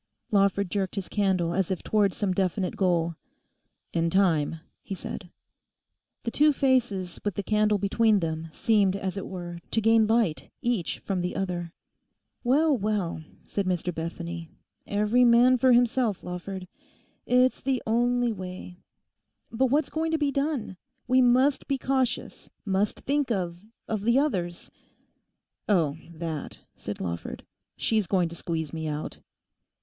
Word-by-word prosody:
Lawford 200 Hz, -2 st, +2 dB
jerked 195 Hz, -2 st, -1 dB
his 195 Hz, -3 st, -3 dB
candle 185 Hz, -5 st, +1 dB
as 190 Hz, -1 st, 0 dB
if 190 Hz, -3 st, -2 dB
towards 205 Hz, -3 st, +2 dB
some 200 Hz, -3 st, 0 dB
definite 185 Hz, 0 st, -1 dB
goal. 170 Hz, -3 st, +1 dB, 0.8 s
'In 165 Hz, 0 st, +1 dB
time,' 165 Hz, -4 st, +2 dB, 0.2 s
he 195 Hz, -, -5 dB
said. 185 Hz, 0 st, -7 dB, 0.9 s
The 230 Hz, -, -2 dB
two 300 Hz, +4 st, +5 dB
faces 240 Hz, -10 st, +1 dB
with 205 Hz, -3 st, -2 dB
the 200 Hz, -, -2 dB
candle 210 Hz, +1 st, +2 dB
between 210 Hz, +2 st, +3 dB
them 160 Hz, -1 st, -3 dB
seemed 200 Hz, +1 st, +2 dB
as 195 Hz, -1 st, -3 dB
it 195 Hz, -, -5 dB
were 175 Hz, -2 st, -6 dB
to -, -, +1 dB
gain 225 Hz, 0 st, +4 dB
light 220 Hz, -8 st, +1 dB
each 235 Hz, -8 st, -1 dB
from 190 Hz, -3 st, -2 dB
the 180 Hz, -, -3 dB
other. 175 Hz, -3 st, -3 dB, 0.7 s
'Well, 290 Hz, +4 st, +4 dB
well,' 200 Hz, -6 st, -1 dB, 0.2 s
said 200 Hz, -2 st, -2 dB
Mr 180 Hz, -1 st, -1 dB
Bethany, 170 Hz, 0 st, -5 dB, 0.4 s
'every 210 Hz, +4 st, +3 dB
man 245 Hz, +1 st, +6 dB
for 260 Hz, +1 st, +5 dB
himself, 240 Hz, -3 st, +2 dB
Lawford; 180 Hz, +1 st, -6 dB, 0.6 s
it's 250 Hz, +1 st, +3 dB
the 265 Hz, -2 st, -1 dB
only 240 Hz, +1 st, +2 dB
way. 185 Hz, -1 st, -8 dB, 0.7 s
But 260 Hz, +3 st, +2 dB
what's 290 Hz, +5 st, +1 dB
going 320 Hz, +1 st, -1 dB
to -, -, +3 dB
be 290 Hz, -2 st, +1 dB
done? 275 Hz, -, -2 dB, 0.3 s
We 255 Hz, +1 st, +5 dB
must 255 Hz, +3 st, +3 dB
be 275 Hz, -, 0 dB
cautious; 260 Hz, -1 st, -1 dB, 0.2 s
must 195 Hz, +1 st, 0 dB
think 285 Hz, -1 st, 0 dB
of—of 200 Hz, +2 st, -4 dB
the 235 Hz, +4 st, +3 dB
others?' 180 Hz, -, -1 dB, 1.0 s
'Oh, 165 Hz, -8 st, +3 dB, 0.2 s
that,' 160 Hz, -2 st, -5 dB, 0.2 s
said 105 Hz, -, -6 dB
Lawford; 85 Hz, -2 st, -5 dB, 0.3 s
'she's 215 Hz, -4 st, +1 dB
going 180 Hz, -3 st, +2 dB
to 170 Hz, -, -8 dB
squeeze 160 Hz, -3 st, -3 dB
me 160 Hz, -1 st, -3 dB
out. 150 Hz, 0 st, -4 dB
200 Hz, 145 wpm, -27 LUFS, 175-240 Hz, 1.0 s, man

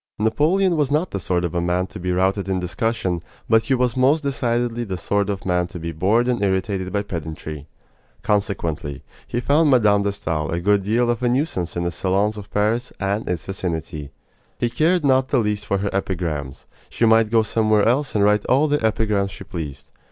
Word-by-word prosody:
Napoleon 165 Hz, -, +2 dB
was 145 Hz, -3 st, +1 dB
not 155 Hz, +5 st, 0 dB
the 100 Hz, -, -3 dB
sort 90 Hz, 0 st, 0 dB
of 85 Hz, -, -3 dB
a 85 Hz, -, 0 dB
man 90 Hz, +1 st, 0 dB
to 80 Hz, -, -10 dB
be 90 Hz, +1 st, -2 dB
routed 95 Hz, +2 st, +1 dB
in 95 Hz, -1 st, 0 dB
discussion, 90 Hz, -1 st, -1 dB, 0.3 s
but 115 Hz, 0 st, +5 dB
he 135 Hz, -, +2 dB
was 125 Hz, -2 st, 0 dB
most 135 Hz, +5 st, +3 dB
decidedly 120 Hz, -3 st, -1 dB
the 95 Hz, -5 st, -4 dB
sort 100 Hz, +3 st, 0 dB
of 100 Hz, -1 st, -3 dB
man 90 Hz, -1 st, +1 dB
to 90 Hz, -1 st, -8 dB
be 85 Hz, 0 st, -4 dB
bored 100 Hz, +9 st, +2 dB
and 125 Hz, -3 st, 0 dB
irritated 95 Hz, -1 st, -1 dB
by 100 Hz, 0 st, 0 dB
pedantry. 80 Hz, -4 st, -6 dB, 0.6 s
Consequently, 80 Hz, -8 st, -1 dB, 0.2 s
he 120 Hz, -, -2 dB
found 145 Hz, +5 st, +3 dB
Mme. 105 Hz, -6 st, +4 dB
de 100 Hz, 0 st, 0 dB
Stael 80 Hz, -6 st, -3 dB
a 85 Hz, -, -1 dB
good 100 Hz, +3 st, +2 dB
deal 120 Hz, +5 st, +1 dB
of 120 Hz, 0 st, -3 dB
a 125 Hz, -, +2 dB
nuisance 120 Hz, -, -1 dB
in 85 Hz, -, -1 dB
the 85 Hz, -, -1 dB
salons 100 Hz, +5 st, 0 dB
of 100 Hz, -1 st, -9 dB
Paris 110 Hz, +4 st, 0 dB
and 100 Hz, +2 st, -1 dB
its 85 Hz, -3 st, -2 dB
vicinity. 80 Hz, -6 st, -4 dB, 0.5 s
He 120 Hz, -, -1 dB
cared 165 Hz, +3 st, +2 dB
not 130 Hz, -1 st, +3 dB
the 135 Hz, -, +1 dB
least 105 Hz, -2 st, -1 dB
for 100 Hz, -, +1 dB
her 100 Hz, +1 st, -1 dB
epigrams. 85 Hz, -8 st, -3 dB, 0.2 s
She 115 Hz, -, +1 dB
might 110 Hz, -1 st, +4 dB
go 115 Hz, 0 st, +3 dB
somewhere 110 Hz, -1 st, +2 dB
else 135 Hz, +3 st, +1 dB
and 105 Hz, -, +3 dB
write 105 Hz, 0 st, +3 dB
all 140 Hz, +4 st, +3 dB
the 145 Hz, -4 st, 0 dB
epigrams 105 Hz, -3 st, +1 dB
she 95 Hz, -, -10 dB
pleased. 80 Hz, -8 st, -7 dB
100 Hz, 205 wpm, -22 LUFS, 90-120 Hz, 0.6 s, but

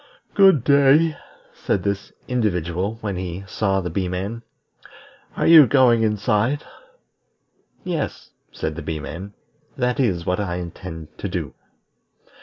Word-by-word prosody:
"Good 190 Hz, -, +5 dB
day," 145 Hz, +3 st, +4 dB, 0.4 s
said 95 Hz, -, -2 dB
this 100 Hz, -1 st, -3 dB, 0.2 s
individual 100 Hz, -3 st, -1 dB
when 100 Hz, -4 st, -3 dB
he 90 Hz, +1 st, -5 dB
saw 95 Hz, -1 st, 0 dB
the 90 Hz, -2 st, -4 dB
Bee 95 Hz, +2 st, -1 dB
man. 95 Hz, +6 st, -4 dB, 1.0 s
"Are -, -, 0 dB
you 160 Hz, -5 st, +9 dB
going 125 Hz, -3 st, +4 dB
inside?" 110 Hz, +6 st, +1 dB, 1.2 s
"Yes," 170 Hz, -5 st, -4 dB, 0.2 s
said 80 Hz, -, -4 dB
the 85 Hz, -, -6 dB
Bee 80 Hz, +1 st, -4 dB
man, 85 Hz, +7 st, -8 dB, 0.4 s
"that 125 Hz, 0 st, 0 dB
is 95 Hz, -10 st, 0 dB
what 90 Hz, +2 st, 0 dB
I 90 Hz, -4 st, -2 dB
intend 85 Hz, -2 st, -8 dB
to -, -, -4 dB
do." -, -, -4 dB
100 Hz, 130 wpm, -22 LUFS, 90-125 Hz, 1.2 s, you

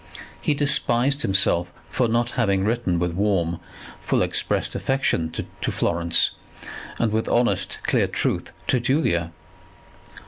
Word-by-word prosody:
He 150 Hz, -, +1 dB
despised 140 Hz, -1 st, +2 dB
himself 90 Hz, -4 st, +2 dB, 0.2 s
for 125 Hz, -, +1 dB
not 120 Hz, +1 st, 0 dB
having 100 Hz, -6 st, +1 dB
written 110 Hz, -6 st, 0 dB
with 90 Hz, 0 st, -1 dB
warm, 85 Hz, -3 st, 0 dB, 0.4 s
full -, -, 0 dB
expressed -, -, 0 dB
affection 135 Hz, -11 st, 0 dB, 0.3 s
to -, -, -1 dB
Florence 85 Hz, 0 st, +2 dB, 0.7 s
and 115 Hz, -2 st, 0 dB
with 110 Hz, +1 st, -1 dB
honest 120 Hz, 0 st, +2 dB
clear -, -, +2 dB
truth -, -, -2 dB
to 125 Hz, -, +1 dB
Julia. 115 Hz, -, 0 dB
110 Hz, 125 wpm, -23 LUFS, 85-125 Hz, 0.7 s, despised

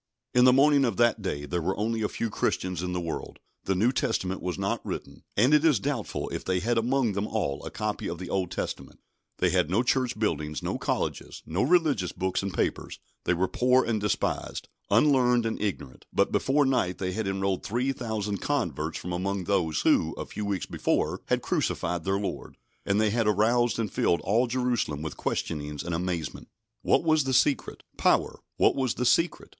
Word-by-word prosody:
In 125 Hz, 0 st, +6 dB
the 130 Hz, -, +8 dB
morning 140 Hz, +2 st, +5 dB
of 115 Hz, -7 st, 0 dB
that 120 Hz, -2 st, +3 dB
day 75 Hz, -7 st, -3 dB
there 85 Hz, +3 st, -2 dB
were 95 Hz, +4 st, -1 dB
only 110 Hz, +2 st, -1 dB
a 105 Hz, -, 0 dB
few 115 Hz, -, -3 dB
Christians 90 Hz, -3 st, -1 dB
in 90 Hz, 0 st, -3 dB
the 90 Hz, -, -1 dB
world; 85 Hz, -2 st, -5 dB, 0.3 s
the 95 Hz, -, +1 dB
New 110 Hz, +7 st, +3 dB
Testament 95 Hz, -7 st, -1 dB
was 90 Hz, -, -3 dB
not 100 Hz, 0 st, -2 dB
written, -, -, -6 dB, 0.2 s
and 125 Hz, +8 st, +4 dB
it 150 Hz, 0 st, +5 dB
is 150 Hz, -9 st, +4 dB
doubtful -, -, -3 dB
if -, -, -4 dB
they 95 Hz, -1 st, 0 dB
had 115 Hz, +4 st, +1 dB
among 120 Hz, -1 st, +1 dB
them 100 Hz, +2 st, -2 dB
all 100 Hz, -12 st, -2 dB
a -, -, -5 dB
copy 105 Hz, -1 st, -3 dB
of 85 Hz, -, -4 dB
the 90 Hz, +1 st, -7 dB
Old 95 Hz, -1 st, -1 dB
Testament; -, -, -5 dB, 0.4 s
they -, -, +2 dB
had 75 Hz, -, +2 dB
no 105 Hz, +7 st, +2 dB
church 125 Hz, -2 st, +1 dB
buildings, 75 Hz, -8 st, -2 dB
no -, -, -2 dB
colleges, -, -, -3 dB
no 85 Hz, +5 st, -1 dB
religious 145 Hz, -, +2 dB
books 95 Hz, 0 st, -1 dB
and 100 Hz, 0 st, -3 dB
papers; -, -, -2 dB, 0.3 s
they 90 Hz, -, +2 dB
were 95 Hz, +2 st, +1 dB
poor 125 Hz, +3 st, +3 dB
and 110 Hz, -3 st, -1 dB
despised, 105 Hz, -, -2 dB, 0.2 s
unlearned 125 Hz, +1 st, +4 dB
and 115 Hz, -, -2 dB
ignorant; 95 Hz, -11 st, -4 dB
but -, -, +2 dB
before 145 Hz, +2 st, +2 dB
night 125 Hz, -9 st, +1 dB
they 95 Hz, -1 st, -2 dB
had 110 Hz, +1 st, -2 dB
enrolled 95 Hz, -1 st, -1 dB
three 125 Hz, +5 st, 0 dB
thousand 110 Hz, -6 st, -3 dB
converts 80 Hz, -1 st, -2 dB
from 90 Hz, -, -5 dB
among 95 Hz, +2 st, -2 dB
those 85 Hz, -5 st, 0 dB
who, -, -, +3 dB
a -, -, -5 dB
few 105 Hz, -, -5 dB
weeks 100 Hz, -3 st, -2 dB
before, -, -, -1 dB
had -, -, +1 dB
crucified 85 Hz, -1 st, -1 dB
their 95 Hz, 0 st, +1 dB
Lord, 100 Hz, -, -5 dB, 0.3 s
and 100 Hz, +1 st, +2 dB
they 110 Hz, -1 st, +3 dB
had 115 Hz, -1 st, +1 dB
aroused 115 Hz, +4 st, +2 dB
and 110 Hz, -4 st, -2 dB
filled 85 Hz, -, +2 dB
all 115 Hz, +6 st, +2 dB
Jerusalem 120 Hz, -, -1 dB
with 80 Hz, -, -5 dB
questionings 75 Hz, -2 st, -3 dB
and 85 Hz, -, -4 dB
amazement. 85 Hz, -2 st, -3 dB, 0.3 s
What -, -, +3 dB
was 155 Hz, -3 st, +3 dB
the 135 Hz, -, -1 dB
secret? 140 Hz, +2 st, +1 dB
Power. -, -, +2 dB, 0.2 s
What -, -, +4 dB
was 130 Hz, -3 st, 0 dB
the 125 Hz, -, -1 dB
secret? 165 Hz, +7 st, +2 dB
105 Hz, 200 wpm, -27 LUFS, 90-125 Hz, 0.4 s, the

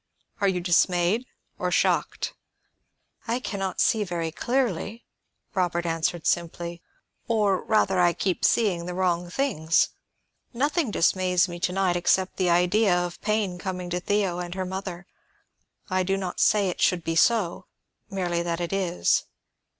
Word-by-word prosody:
Are 200 Hz, -, +2 dB
you 180 Hz, -2 st, 0 dB
dismayed, 180 Hz, +6 st, +2 dB, 0.3 s
or -, -, 0 dB
shocked?" -, -, 0 dB, 0.9 s
"I 235 Hz, +2 st, 0 dB
can 205 Hz, -5 st, -5 dB
not 190 Hz, -1 st, -3 dB
see 220 Hz, -2 st, +3 dB
very 170 Hz, -4 st, -3 dB
clearly," 235 Hz, 0 st, -2 dB, 0.5 s
Robert 175 Hz, -3 st, 0 dB
answered 165 Hz, 0 st, -1 dB
simply. 170 Hz, 0 st, -2 dB, 0.5 s
"Or, 210 Hz, -5 st, +2 dB
rather, 195 Hz, -4 st, +2 dB
I 175 Hz, -1 st, +4 dB
keep 180 Hz, +1 st, -2 dB
seeing 180 Hz, -7 st, +2 dB
the 180 Hz, -, -4 dB
wrong 175 Hz, -1 st, 0 dB
things. 175 Hz, -, +1 dB, 0.6 s
Nothing 290 Hz, +3 st, 0 dB
dismays 180 Hz, -1 st, +2 dB
me 175 Hz, -1 st, -7 dB
to 180 Hz, -, 0 dB
night 185 Hz, -1 st, +1 dB
except 185 Hz, +2 st, +1 dB
the 185 Hz, -1 st, +1 dB
idea 180 Hz, +3 st, +3 dB
of 175 Hz, 0 st, -3 dB
pain 210 Hz, -4 st, -1 dB
coming 180 Hz, -1 st, -5 dB
to 180 Hz, -, 0 dB
Theo 195 Hz, -2 st, 0 dB
and 175 Hz, 0 st, -5 dB
her 190 Hz, -1 st, -2 dB
mother. 190 Hz, -1 st, -5 dB, 0.8 s
I 185 Hz, -1 st, +1 dB
do 195 Hz, +1 st, 0 dB
not 185 Hz, -2 st, -4 dB
say 205 Hz, -2 st, +4 dB
it 180 Hz, -, -5 dB
should 175 Hz, -2 st, +2 dB
be 165 Hz, -, -2 dB
so; 190 Hz, -2 st, +2 dB, 0.4 s
merely 180 Hz, -3 st, -1 dB
that 170 Hz, 0 st, -2 dB
it 175 Hz, +1 st, -3 dB
is. 185 Hz, -3 st, +1 dB
180 Hz, 150 wpm, -25 LUFS, 175-200 Hz, 0.9 s, I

